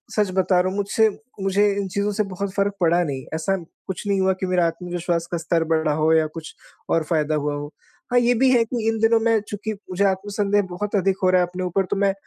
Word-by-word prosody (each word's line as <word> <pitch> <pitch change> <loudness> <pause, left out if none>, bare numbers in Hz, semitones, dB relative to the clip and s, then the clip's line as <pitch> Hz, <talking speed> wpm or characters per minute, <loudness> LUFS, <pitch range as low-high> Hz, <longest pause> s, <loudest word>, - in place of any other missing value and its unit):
सच 210 -3 +1
बता 185 -1 +3
रहा 185 - 0
हूँ, 190 - -5
मुझसे 205 +2 +2 0.3
मुझे 195 +2 +2
इन 200 -1 -1
चीज़ों 200 +2 -1
से 215 +1 0
बहुत 195 0 -5
फ़र्क 200 0 0
पड़ा 175 +1 +3
नहीं। 135 -5 -4
ऐसा 195 +5 0 0.3
कुछ 190 +2 -5
नहीं 200 -1 +1
हुआ 190 0 +3
कि - - +1
मेरा 180 -1 +2
आत्मविश्वास 170 0 -3
का 175 - 0
स्तर 165 0 0
बढ़ा 160 -1 +1
हो 155 +1 +2
या 160 -1 +3
कुछ 155 0 -9 0.4
और 165 - +2
फ़ायदा 155 -1 0
हुआ 150 0 -1
हो। 145 +1 -6 0.4
हाँ, 245 - +5
ये 245 0 +3
भी 260 +2 +3
है 240 -2 +4
कि 225 -1 -3
इन 225 - -1
दिनों 225 0 +4
मैं 225 -1 +4
चूँकि 215 +1 -4
मुझे 200 -1 -3
आत्मसंदेह 205 +1 +1
बहुत 205 +4 -3
अधिक 195 -1 +1
हो 185 - +4
रहा 185 0 +4
है 180 - +1
अपने 180 +1 -5
ऊपर, 185 +2 0
तो - - -2
मैं 200 0 +2
190 Hz, 245 wpm, -22 LUFS, 170-205 Hz, 0.4 s, हाँ